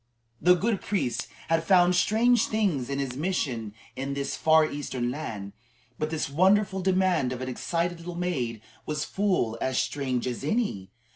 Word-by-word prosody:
The 180 +1 +6
good 205 +2 0
priest 125 - -1 0.2
had 165 0 +2
found 180 0 +5
strange 225 +5 +3
things 185 - 0
in 140 - -2
his 135 -3 -3
mission 140 -8 -1
work 105 - -9 0.2
in 135 +1 -3
this 140 0 -2
far 160 0 +5
Eastern 130 -5 -3
land, 110 -9 -6 0.5
but 155 - -1
this 160 -1 -2
wrathful 190 +6 +3
demand 185 -8 +2
of 125 - -4
an 130 - -4
excited 170 +6 -2
little 170 +1 -7
maid 130 -11 -2 0.3
was 150 0 -2
full 185 - 0
as 130 -1 0
strange 130 -4 -1
as 125 0 -3
any. 150 - -1
155 Hz, 165 wpm, -27 LUFS, 130-185 Hz, 0.5 s, The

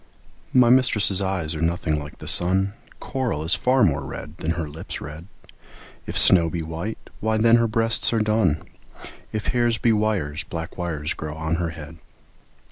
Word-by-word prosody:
MY 125 -2 +5
mistress' 105 -6 +4
eyes 95 -5 -2
are 80 - -5
nothing 80 -2 -1
like 75 +1 -10
the - - -11
sun; 95 +3 +3 0.3
Coral 125 - -3
is 80 +3 +4
far 130 0 +2
more 70 -3 +1
red 75 +3 -8
than 80 -1 -2
her 80 -3 -3
lips' 75 +2 -7
red; 75 +4 -9 0.8
If - - -4
snow 85 -3 +5
be 85 0 -4
white, 80 +7 -5 0.2
why 110 0 0
then 115 +1 +5
her 115 0 +1
breasts 115 +1 +4
are 115 - +1
dun; 110 -8 +1 0.7
If 110 -1 -3
hairs 120 -2 +1
be 115 0 +2
wires, 100 -9 -1
black 80 0 -7
wires 80 -3 -3
grow 75 0 -7
on 80 +1 -2
her 85 -1 -2
head. 80 +1 -10
90 Hz, 175 wpm, -23 LUFS, 80-110 Hz, 0.8 s, MY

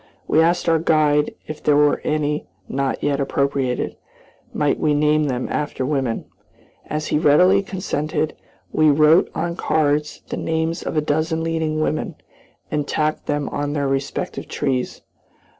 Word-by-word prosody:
We 160 - +4
asked 175 +2 +2
our 165 -1 +4
guide 150 -2 +2
if 155 - -7
there 150 - +3
were 145 0 +4
any 150 0 -1 0.2
not 135 0 -2
yet 145 -1 +1
appropriated, 140 -2 -1 0.5
might 145 -1 0
we 150 -1 +2
name 150 +1 +3
them 125 -3 -2
after 145 -3 -2
women. 135 -5 -1 0.6
As 155 0 -3
he - - +2
readily 180 +6 +5
consented, 155 -6 -2 0.4
we 155 0 +4
wrote 155 +3 +5
on 170 0 -2
cards 150 -3 0
the - - -3
names 160 +1 -1
of - - -4
a - - +4
dozen 155 +2 0
leading 160 -1 -1
women, 155 0 -1 0.6
and 150 -1 -1
tacked 155 0 -1
them 145 -1 -1
on 145 0 -2
their 140 -2 0
respective 135 0 -3
trees. 130 -2 -2
150 Hz, 150 wpm, -21 LUFS, 145-155 Hz, 0.6 s, readily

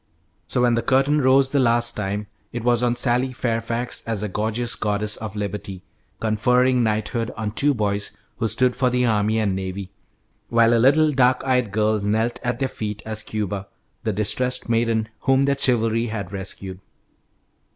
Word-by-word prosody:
So 125 - 0
when 120 -1 +4
the 115 - +1
curtain 135 +4 +2
rose 130 0 +4
the 140 - +2
last 120 -1 +2
time, 105 0 -3 0.3
it 120 -1 -5
was 120 -1 +2
on 120 -1 +1
Sally 125 +1 +1
Fairfax 115 0 -2
as 110 -2 -1
a - - -1
gorgeous 110 +4 -1
Goddess 105 0 -1
of 110 -2 -7
Liberty, 100 -2 -5 0.4
conferring 125 +4 +2
knighthood 110 +1 -1
on 110 -1 -3
two 140 +5 +1
boys 105 -2 -1 0.3
who 115 - 0
stood 125 +2 +1
for 125 -1 +2
the 125 0 +1
Army 110 -1 +1
and 105 -4 0
Navy, 95 0 -5 0.6
while 115 0 +4
a 115 - +3
little 150 +4 +5
dark 130 -2 +3
eyed 125 -5 +1
girl 110 0 +1
knelt 110 +4 0
at 120 -1 -2
their 135 - 0
feet 105 -4 -5
as 110 -1 -2
Cuba, 100 -3 -4 0.4
the 110 - 0
distressed 125 +5 0
maiden 115 -1 +1
whom 135 +1 +2
their 140 0 +2
chivalry 115 -3 +1
had 105 -5 -5
rescued. 95 -1 -6
115 Hz, 170 wpm, -22 LUFS, 105-125 Hz, 0.6 s, little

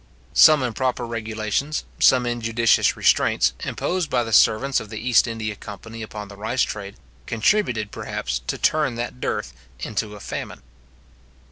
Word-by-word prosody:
Some 155 -3 +7
improper 125 0 -1
regulations, 115 +5 -2 0.2
some 125 -2 +5
injudicious 115 -1 +2
restraints, - - +3
imposed 180 -3 -2
by 120 - +1
the 115 -1 -5
servants 130 +6 +4
of 105 - -9
the 110 - -7
East 120 +1 +3
India 110 -2 -4
Company 115 +3 -9
upon 105 -2 -7
the 100 - -11
rice 110 +6 0
trade, 100 -1 -5 0.3
contributed, 115 - +1
perhaps, 65 0 -4
to - - -2
turn 150 -5 +1
that 120 +2 -5
dearth - - -2 0.3
into 105 +5 -3
a - - -10
famine. 95 - -6
115 Hz, 145 wpm, -23 LUFS, 110-125 Hz, 0.3 s, Some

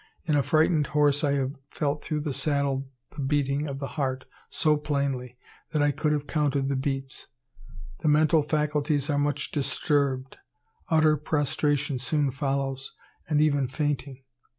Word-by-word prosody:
In 155 -3 +2
a 145 - +4
frightened 155 0 +2
horse 145 0 +3
I 145 -1 +2
have 135 -1 0 0.2
felt 145 0 -2
through 150 -1 -2
the 145 -2 -3
saddle 140 -2 0 0.3
the 145 - -4
beating 140 +1 0
of 140 -1 -4
the 140 - -4
heart 130 -3 -2 0.2
so 155 -2 +2
plainly 140 -4 -2 0.3
that 150 -2 +1
I 145 - +3
could 150 +1 0
have 145 -1 0
counted 145 -2 0
the 140 - 0
beats. 135 0 -3 0.7
The - - -2
mental 155 +1 +4
faculties 150 -1 0
are 145 - +1
much 145 0 -1
disturbed. 140 -2 0 0.5
Utter 155 -1 +4
prostration 145 -2 0
soon 145 +2 +1
follows, 135 -1 -2 0.4
and 150 -2 +3
even 145 -3 +2
fainting. 135 -1 -3
145 Hz, 150 wpm, -27 LUFS, 135-150 Hz, 0.7 s, a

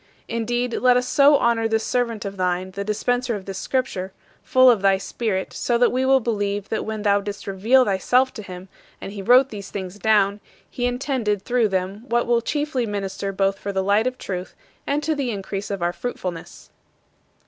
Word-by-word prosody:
Indeed, 240 +1 -1
let 250 -1 +5
us 250 0 -1
so 285 +1 +5
honor 230 -2 +2
this 220 0 0
servant 235 -3 -1
of 200 0 -5
thine, 185 0 -1
the 200 +1 -4
dispenser 240 +3 -1
of 195 -2 -7
this 195 -1 -5
Scripture, 195 -6 -2 0.3
full 255 -3 +4
of 220 -5 +1
thy 195 -1 +4
Spirit, 195 -1 -3
so 240 - 0
that 245 +1 +3
we 260 +1 0
will 270 0 +5
believe 205 -4 -2
that 220 - -2
when 220 -1 -4
thou 200 -1 +3
didst 200 0 -6
reveal 220 +7 +3
thyself 245 +7 +2
to 215 - -7
him, 185 -1 -9 0.3
and - - -7
he 200 -1 -6
wrote 250 +6 +5
these 200 -2 -8
things 190 0 -6
down, 205 -2 +3 0.3
he 245 0 -2
intended 245 -5 -1
through 240 -1 +2
them 195 +3 -3
what 240 0 +2
will 235 0 +2
chiefly 290 -2 -1
minister 195 -1 -3
both 195 0 0
for 200 - -4
the 190 -1 -1
light 205 +4 +2
of 255 0 -3
truth 185 -5 -6 0.3
and 290 +2 0
to 315 +2 +1
the 280 -4 -2
increase 200 -1 -4
of 200 -3 -3
our 175 0 0
fruitfulness. 180 -5 -6
215 Hz, 200 wpm, -22 LUFS, 195-245 Hz, 0.3 s, let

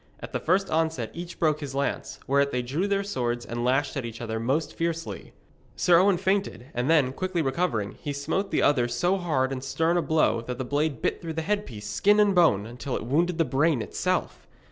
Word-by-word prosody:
At - - -9
the - - 0
first 190 +4 +1
onset 160 -8 0
each 175 +1 -7
broke 155 -2 +2
his 140 -3 -6
lance; 140 0 -2
whereat 140 +1 +2
they 125 -2 -1
drew 150 +11 -1
their 200 0 +1
swords 120 -10 -2
and 120 0 -4
lashed 135 +3 +1
at 135 - -2
each 115 -1 -7
other 110 -1 -3
most 135 +7 -1
fiercely. 165 0 -4 0.4
Sir 175 -2 +5
Owen 190 0 +4
feinted, 190 - -1
and 125 +4 -1
then, 145 -6 +4
quickly 185 0 -1
recovering, 135 - -1
he 145 - -3
smote 145 +8 -2
the - - +1
other 125 -5 +3
so 180 +9 +1
hard 150 -8 0
and 130 -1 -4
stern 160 +6 +1
a - - +3
blow 155 -8 +2
that 125 +1 -5
the 130 - -3
blade 145 +2 -1
bit - - 0
through 165 -2 -5
headpiece, 160 - -2
skin 205 - +3
and 205 -1 +4
bone, 160 - +4
until 125 +3 -5
it - - -4
wounded 165 +7 +1
the 165 - +3
brain 145 -3 +1
itself. - - -2
145 Hz, 210 wpm, -26 LUFS, 125-175 Hz, 0.4 s, Sir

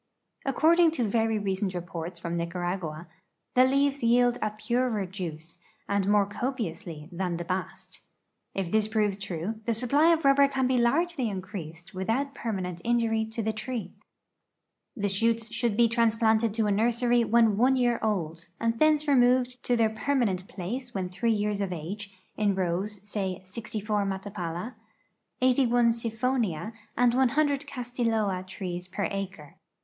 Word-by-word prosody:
According 325 +5 +5
to 255 - 0
ver}^ 225 +2 +2 0.2
recent 190 0 -1
re[)orts 170 -1 -6
from 170 0 -3
Nicaragua, 170 -1 -3 0.5
the 250 - +6
leaves 275 +1 +2
jdeld 245 0 +3
a 215 - +1
purer 215 0 -1
juice, 170 -3 -7 0.3
and 200 -1 0
more 205 -1 +4
copiously, 205 - -4
than 175 -1 -2
the 175 - -5
bast. 185 +2 -5 0.6
If 190 -3 -2
this 215 -1 +2
proves 215 -2 +1
true, 200 +2 -5
the 235 - +1
sui)ply 280 +8 +3
of 325 -3 +1
rubber 275 0 +6
can 265 -2 0
be 255 -1 +2
largely 275 +1 +1
increased 185 -3 -7
with 190 +2 -4
out 275 +4 0
permanent 185 -8 -4
injury 230 -2 +1
to 225 +1 -4
the 220 +1 0
tree. 235 +2 -5 1.0
The 205 -1 0
shoots 225 +3 0
should 230 -4 0
be 235 -1 +6
transplanted 225 -1 +2
to 225 -2 +1
a 205 - +1
nursery 235 +3 +2
when 230 -2 +4
one 255 +5 +4
year 240 -2 +2
old, 170 -6 -2
and 230 0 0
thence 310 -1 +3
removed 250 -2 +3
to 245 - +2
their 225 -2 +2
permanent 220 -6 0
place 240 +7 -5
when 185 -2 -2
3 230 +6 0
years 210 -1 0
of 195 -2 -2
age, 195 +5 -6 0.2
in 205 -2 +1
roAvs— 190 +3 -2
say, 195 -3 -3
64 210 +1 -3
Matapala, 190 +1 -4 0.7
81 245 -2 +4
Siphonia, 230 -4 -1 0.2
and 245 -1 +4
100 280 +3 +2
Castilloa 230 -7 -1
trees 180 -1 -5
per 195 +2 -2
acre. 190 -7 -6
220 Hz, 150 wpm, -28 LUFS, 190-245 Hz, 1.0 s, the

